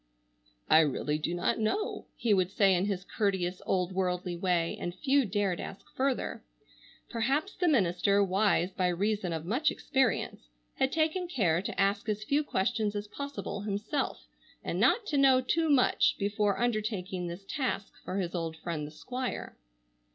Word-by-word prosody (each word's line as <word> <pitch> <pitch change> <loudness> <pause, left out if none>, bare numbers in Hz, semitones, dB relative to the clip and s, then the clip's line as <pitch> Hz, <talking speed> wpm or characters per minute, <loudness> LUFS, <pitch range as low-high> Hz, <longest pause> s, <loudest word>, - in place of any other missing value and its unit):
"I 155 - +7
really 150 0 +1
do 170 +3 -2
not 175 - 0
know," 310 - -1
he 225 -3 +1
would 185 -2 +2
say 195 0 +4
in 180 +1 +2
his 195 -2 -2
courteous, 190 -4 -1
old 180 -1 +1
worldly 180 -1 -1
way, 170 -2 0
and 175 0 -4
few 275 +3 +2
dared 200 -3 0
ask 195 - -8
further. 265 -1 -1 0.7
Perhaps 270 - 0
the 360 - +1
minister, 200 - +3
wise 195 -1 +2
by 185 -1 0
reason 195 +1 0
of 160 -1 -3
much 255 - +2
experience, 260 - -1 0.3
had 265 0 +2
taken 325 +4 0
care 180 - +1
to 200 - -5
ask 200 +2 +1
as 215 0 -1
few 285 +6 +1
questions 215 -3 0
as 205 0 -4
possible 280 -7 -5
himself, 210 +8 -2 0.4
and - - -2
not 470 - +3
to 290 -8 0
know 265 -2 +6
too 320 +5 +1
much 275 -4 +4
before 205 0 0
undertaking 210 -6 -1
this 175 +3 -7
task 255 -7 -2
for 185 - -4
his 180 -3 -2
old 165 -2 -3
friend 160 -3 -4
the - - -10
Squire. 250 +10 -5
200 Hz, 165 wpm, -30 LUFS, 180-255 Hz, 0.7 s, I